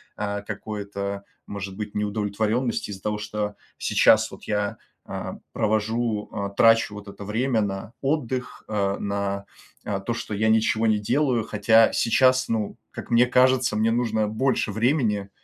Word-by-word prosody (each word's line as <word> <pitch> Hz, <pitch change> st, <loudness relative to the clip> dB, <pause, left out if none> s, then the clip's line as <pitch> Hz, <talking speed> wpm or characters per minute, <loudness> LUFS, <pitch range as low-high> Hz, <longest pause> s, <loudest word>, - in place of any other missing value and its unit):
а, 100 Hz, -1 st, -3 dB
какое-то, 100 Hz, -1 st, -5 dB, 0.2 s
может 100 Hz, -1 st, -6 dB
быть, 105 Hz, 0 st, -6 dB
неудовлетворенности 105 Hz, +3 st, -1 dB
из-за 95 Hz, -1 st, -8 dB
того, 105 Hz, 0 st, -1 dB
что 105 Hz, 0 st, -3 dB, 0.2 s
сейчас -, -, +4 dB
вот -, -, -12 dB
я, 105 Hz, -1 st, -1 dB, 0.3 s
а, -, -, -5 dB
провожу, 110 Hz, 0 st, 0 dB
а, 100 Hz, -1 st, -3 dB
трачу 115 Hz, +1 st, +4 dB
вот 105 Hz, 0 st, -9 dB
это 100 Hz, 0 st, -9 dB
время 115 Hz, +3 st, 0 dB
на 100 Hz, 0 st, -3 dB
отдых, 130 Hz, -3 st, -2 dB
э, 100 Hz, -2 st, 0 dB
на, 100 Hz, -1 st, -2 dB, 0.4 s
а, 100 Hz, -1 st, -2 dB
то, 110 Hz, +5 st, -3 dB
что 115 Hz, -, -5 dB
я 110 Hz, +2 st, +1 dB
ничего 110 Hz, 0 st, +3 dB
не 110 Hz, -1 st, +3 dB
делаю. 120 Hz, +2 st, +1 dB
Хотя 110 Hz, +1 st, +4 dB
сейчас, 130 Hz, +2 st, +3 dB
ну, 110 Hz, -2 st, -2 dB
как -, -, -9 dB
мне 120 Hz, +1 st, +6 dB
кажется, 125 Hz, -1 st, +3 dB
мне 110 Hz, +1 st, +2 dB
нужно 110 Hz, -2 st, +1 dB
больше 125 Hz, 0 st, 0 dB
времени, 110 Hz, -3 st, +1 dB
110 Hz, 150 wpm, -24 LUFS, 100-115 Hz, 0.4 s, мне